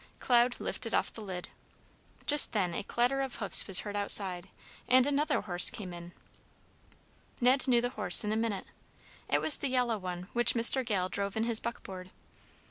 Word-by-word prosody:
Cloud 240 0 0
lifted 230 -2 -5
off - - -3
the 225 - -11
lid. 185 -4 -9 0.8
Just 295 0 +6
then 185 -5 -2
a - - -5
clatter 245 +6 -2
of 270 -2 -6
hoofs 200 - +3
was 190 -2 +2
heard 205 -1 -9
outside, 195 -2 0 0.4
and 255 0 +3
another 290 +2 -2
horse 175 -3 +6
came 185 -5 -10
in. 175 0 -12 1.3
Ned 255 +2 +1
knew 240 -2 +1
the 245 - -3
horse 215 -3 +5
in 210 - -4
a - - -3
minute. 220 -3 -4 0.6
It - - 0
was 305 - +3
the 280 - -5
yellow 245 -4 -2
one 180 -1 -8
which 240 +1 +2
Mr. 235 +3 +2
Gale 200 -6 -3
drove 200 +2 -5
in 220 - -2
his 230 -1 +2
buckboard. 190 -5 -9
220 Hz, 180 wpm, -28 LUFS, 190-245 Hz, 1.3 s, Just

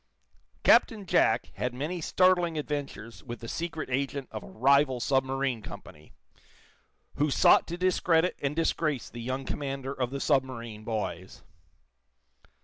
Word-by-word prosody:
Captain 215 -4 +4
Jack - - +2
had 125 0 -2
many 160 +7 -3
startling 175 -1 +3
adventures 140 -7 -5
with 120 -1 -7
the 115 - -8
secret 165 +3 -4
agent 135 +1 -2
of 110 - -5
a - - -12
rival 135 +1 +3
submarine 135 -1 0
company, 75 -6 -11 1.1
who 150 +1 +2
sought - - +5
to 170 - -5
discredit 180 -1 +2
and 140 +1 -1
disgrace 155 -4 -1
the 120 - -7
young 130 +3 -3
commander 135 -1 -4
of 125 -3 -2
the 140 +1 -4
submarine 120 -7 -1
boys. 105 -4 -4
135 Hz, 135 wpm, -28 LUFS, 120-155 Hz, 1.1 s, sought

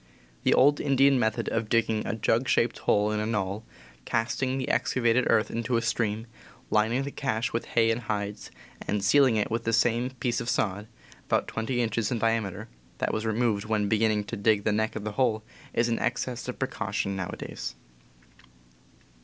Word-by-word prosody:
The - - +3
old 145 +2 +5
Indian 135 -1 +4
method 110 -2 0
of 115 -1 -2
digging 110 -2 +1
a 120 - -1
jug 115 +3 +1
shaped 115 0 +2
hole 105 +1 +2
in 105 - -1
a 105 - -1
knoll, 105 -1 -2 0.4
casting 130 - -1
the 130 - -3
excavated 125 0 +2
earth 110 -1 +3
into 115 +1 -1
a - - +1
stream, 115 -2 -1 0.5
lining 110 +5 +2
the 140 - -5
cache 115 -6 -2
with 115 - -1
hay 115 -1 +4
and 115 +2 -1
hides, 105 -2 -4 0.4
and 105 -1 -1
sealing 130 +3 +5
it 105 -1 0
with 115 - -1
the 115 - 0
same 120 +2 +2
piece 120 -2 -2
of 115 - -4
sod 105 -1 -1 0.4
(about - - +1
twenty 120 +2 -2
inches 110 -1 -1
in 120 - 0
diameter) 110 -2 -1 0.3
that - - -1
was 110 +1 -1
re 110 - +1
moved 110 -3 +1
when 105 -1 0
beginning 110 0 +2
to - - -6
dig 105 0 +2
the 110 - +1
neck 110 +1 0
of 110 - -4
the 105 - -3
hole 110 -4 +2 0.3
is 115 - +1
an 115 -1 0
excess 125 0 -2
of - - -4
precaution 100 0 -2
nowadays. 90 -8 -5
115 Hz, 185 wpm, -27 LUFS, 105-120 Hz, 0.5 s, old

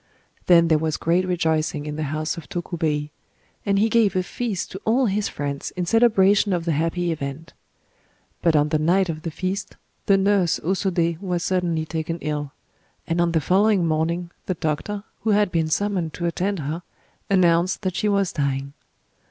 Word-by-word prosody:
Then 170 -2 +6
there 160 -2 +3
was 155 -1 -1
great 175 +3 +1
rejoicing 160 -4 0
in 150 0 -4
the 155 - -4
house 155 +3 -2
of 170 - -10
Tokubei; 160 -4 -2 0.6
and 200 0 +3
he 215 +3 +4
gave 220 -3 +3
a 185 - +2
feast 210 -1 -4
to 190 - -7
all 245 +4 +2
his 205 -1 0
friends 140 -1 -4
in 180 -1 -2
celebration 205 -2 +4
of 170 -2 -1
the 170 - +1
happy 165 +3 0
event. 150 +1 -5 0.9
But 165 -2 +3
on 150 0 +3
the 155 0 +1
night 180 +4 +2
of 155 -1 -4
the 165 - -4
feast 185 +4 -4 0.3
the 195 - +5
nurse 195 -3 +2
O 165 - -2
Sodé 175 -3 0
was 180 -3 -2
suddenly 175 -4 0
taken 160 +1 -3
ill; 150 -3 -3 0.5
and 165 +1 0
on 170 0 +2
the 160 - +3
following 195 +3 +3
morning, 165 +2 -1 0.2
the 185 - -1
doctor, 160 +7 -3 0.2
who 220 - -2
had 210 -3 +2
been 165 -2 +1
summoned 180 -2 -1
to 175 - -3
attend 190 +4 -1
her, 155 +4 -4 0.5
announced 180 0 +3
that 185 -2 -1
she 210 - +1
was 200 -2 +1
dying. 140 -1 -2
170 Hz, 185 wpm, -23 LUFS, 155-195 Hz, 0.9 s, Then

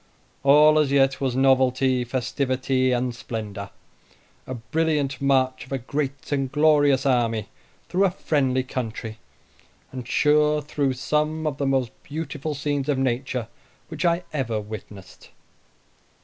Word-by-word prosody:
All 150 +2 +6
as 145 -3 +2
yet 135 -1 +3
was 130 -3 0
novelty, 130 -1 +3
festivity, 130 +1 0
and 125 0 0
splendor 105 -4 -6 0.8
a 130 - -4
brilliant 145 +2 -1
march 130 -2 +1
of - - -19
a 135 - 0
great 140 +3 -4
and 135 -2 -1
glorious 145 -2 +3
army 115 -5 +1 0.4
through 190 +3 +2
a - - +4
friendly 135 -7 0
country, 115 -3 -5 0.7
and 125 -2 -7
sure 150 +1 +3
through 145 -2 -1
some 150 +4 -1
of 150 -3 -2
the 140 - 0
most 130 -3 +1
beautiful 150 0 -5
scenes 145 0 -2
of 145 - +2
nature 130 -2 -1 0.4
which 160 +2 -5
I 170 0 +2
ever 120 -7 -1
witnessed. 105 -2 -10
135 Hz, 135 wpm, -24 LUFS, 125-150 Hz, 0.8 s, All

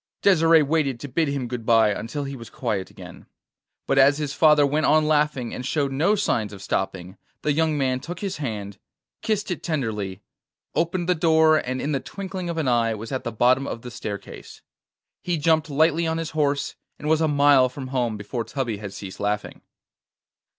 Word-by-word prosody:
Desire 165 -5 +5
waited 140 -4 0
to 145 - -6
bid 160 +4 0
him 140 -3 -2
good 120 -1 -5
bye 115 -2 +4
until 115 +8 -4
he 140 0 -5
was 115 -3 -10
quiet 95 -3 -3
again; - - -12 0.6
but 135 - +2
as 140 +2 +6
his 150 -2 -3
father 150 -2 +5
went 150 +2 +1
on 155 0 +4
laughing 150 -5 +1
and 125 - -5
showed 140 +1 -1
no 160 +10 +2
signs 115 - 0
of 100 - -10
stopping, 95 -1 -3 0.3
the 150 - +2
young 160 0 +1
man 130 -2 0
took 170 +6 -7
his 195 -5 -4
hand, 105 -8 -5 0.4
kissed 210 -3 -1
it 175 - -3
tenderly, 105 - -3 0.5
opened 175 +1 -1
the 180 - +4
door, 160 -1 +4
and 130 +1 -3
in 145 - -2
the 140 - 0
twinkling 190 +2 -6
of 170 - -3
an 155 -4 0
eye 115 -2 +2
was 110 +2 -8
as 130 - 0
at - - -14
the 115 - -3
bottom 125 +5 +2
of 115 - -6
the 125 - -7
staircase. 100 -3 -8 0.6
He 175 -2 -1
jumped 160 +1 +2
lightly 160 +3 +2
on 160 0 -1
his 165 -1 -4
horse, 145 -2 0 0.2
and 150 - -6
was 160 +1 +3
a 160 - +3
mile 140 -3 +5
from 130 0 -8
home 120 -4 -1
before 105 +3 -4
Tubby 115 -2 -3
had 100 -1 -7
ceased 95 -1 -8
laughing. 105 0 -3
140 Hz, 200 wpm, -24 LUFS, 115-160 Hz, 0.6 s, as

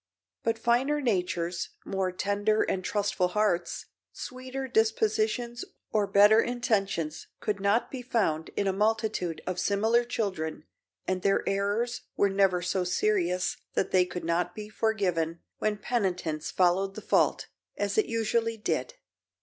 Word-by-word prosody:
But 225 0 0
finer 245 +6 +2
natures, 180 -8 -1 0.2
more 190 -1 -1
tender 205 +3 +1
and 185 - -1
trustful 200 -2 0
hearts, 205 -2 0 0.3
sweeter 255 +1 -6
dispositions 220 +1 +1 0.3
or 210 -2 +2
better 205 +3 +6
intentions 200 -10 -1
could 205 -2 -2
not 200 +4 +1
be 260 - -5
found 200 -11 0
in 200 - +1
a 195 - +1
multitude 215 -4 0
of 185 -1 -2
similar 220 +4 +2
children 185 -10 -3 0.4
and 185 0 0
their 195 +2 +1
errors 205 +5 0 0.2
were 200 -1 +3
never 190 -2 +2
so 180 +1 0
serious 180 -1 +1 0.2
that 190 - 0
they 185 -1 +4
could 175 -2 -6
not 175 +1 0
be 210 -1 -7
forgiven 180 -7 0 0.2
when 215 -1 0
penitence 185 -9 -1
followed 190 +2 +2
the - - -6
fault, - - +2 0.3
as - - -1
it 430 -2 +3
usually 230 0 0
did. - - -2
205 Hz, 140 wpm, -28 LUFS, 180-225 Hz, 0.4 s, better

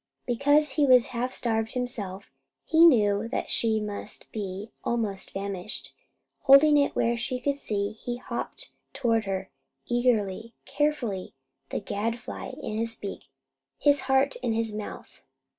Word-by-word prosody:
Because 285 +4 +3
he 290 +1 +2
was 250 -2 +7
half 245 +2 -1
starved 225 -3 -1
himself, 210 -7 -4 0.3
he 330 +1 +7
knew 210 -6 +3
that - - -3
she 220 -2 +2
must 210 -1 -6
be 200 0 -5
almost 215 -5 -1
famished. 195 0 -3 0.5
Holding 290 +2 +7
it 280 - +1
where 235 +1 +2
she 245 +2 -3
could 280 +2 -1
see, 200 -6 -2
he 240 +3 -5
hopped 240 -1 -6 0.2
toward 225 -3 +1
her, 190 -1 -3 0.3
eagerly, 230 -3 0
carefully, 255 -11 -1 0.3
the - - -2
gadfly 230 +3 -4
in 215 0 -3
his 230 0 -2
beak, 200 -3 -7 0.5
his 290 -1 +4
heart 265 +1 +3
in 245 -2 -1
his 225 -1 -1
mouth. 210 0 -8
230 Hz, 140 wpm, -27 LUFS, 205-255 Hz, 0.5 s, was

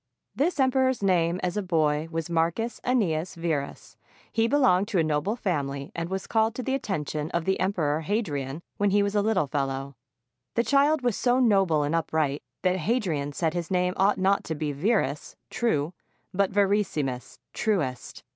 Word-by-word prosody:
This 295 - 0
emperor's 260 -3 +2
name 175 -2 +2
as 180 0 -1
a - - +1
boy 155 -4 +1
was 165 -1 -3
Marcus 170 +8 -1
Annius 185 -10 0
Verus. 160 -4 -4 0.3
He 225 0 +2
belonged 205 -8 +3
to 210 - -1
a 165 - +4
noble 155 +7 0
family, 140 - -2
and 170 0 -4
was 190 0 -3
called 220 0 +1
to 255 - -4
the 265 - -1
attention 155 - -2
of 170 -1 -2
the 190 0 +1
Emperor 160 -6 0
Hadrian 155 - -2
when 205 0 +2
he 200 +1 +3
was 200 0 -1
a 205 - +3
little 205 -7 +2
fellow. 135 -1 -3 0.6
The 235 - +3
child 285 +2 +3
was 245 -4 +1
so 250 0 +2
noble 195 - +3
and 145 +2 -1
upright 155 -3 0 0.2
that 185 0 +2
Hadrian 170 - -1
said 160 +1 0
his 175 -2 -3
name 180 -1 +1
ought 195 +2 +3
not 195 +1 +2
to 160 - -3
be 150 0 -2
Verus 155 0 -1 0.2
(true), 170 -9 0 0.4
but 195 +1 +2
Verissimus 195 -11 0 0.2
(truest). 165 - -2
180 Hz, 175 wpm, -26 LUFS, 155-215 Hz, 0.6 s, a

